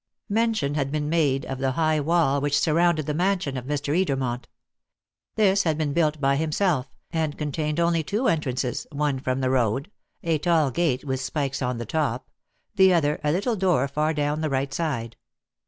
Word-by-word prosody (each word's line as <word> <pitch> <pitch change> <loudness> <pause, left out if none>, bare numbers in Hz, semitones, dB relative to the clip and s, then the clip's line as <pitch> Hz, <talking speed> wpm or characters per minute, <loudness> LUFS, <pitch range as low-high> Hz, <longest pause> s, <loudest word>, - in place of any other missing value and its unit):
Mention 220 -9 +1
has 145 -2 0
been 150 +1 -2
made 145 -5 +1
of 135 -1 -5
the 130 -1 0
high 155 +1 +1
wall 150 -2 +2
which 145 0 +2
surrounded 165 -1 +2
the 150 - -2
mansion 180 -4 0
of 125 -1 -5
Mr. 145 +1 -1
Edermont. 135 -9 0 0.9
This 200 -2 +4
had 160 -5 0
been 150 -3 -1
built 155 -2 +1
by 140 -1 +2
himself, 155 -2 0 0.2
and 160 -3 -1
contained 150 +1 -2
only 170 -1 +2
two 210 - -1
entrances, 130 -6 -1
one 145 -2 -1
from 130 0 -2
the 130 0 +1
road 130 - 0 0.3
a 165 -2 +1
tall 160 -4 +2
gate 135 -3 0
with 130 -1 -2
spikes 135 0 -2
on 125 -1 -1
the 120 - -5
top 135 -2 -2 0.4
the 190 -2 +5
other, 150 -4 +1
a 150 - +2
little 200 +8 0
door 180 -9 +2
far 150 +3 0
down 150 0 -1
the 155 - 0
right 135 0 -1
side. 125 -9 -3
150 Hz, 185 wpm, -25 LUFS, 135-165 Hz, 0.9 s, the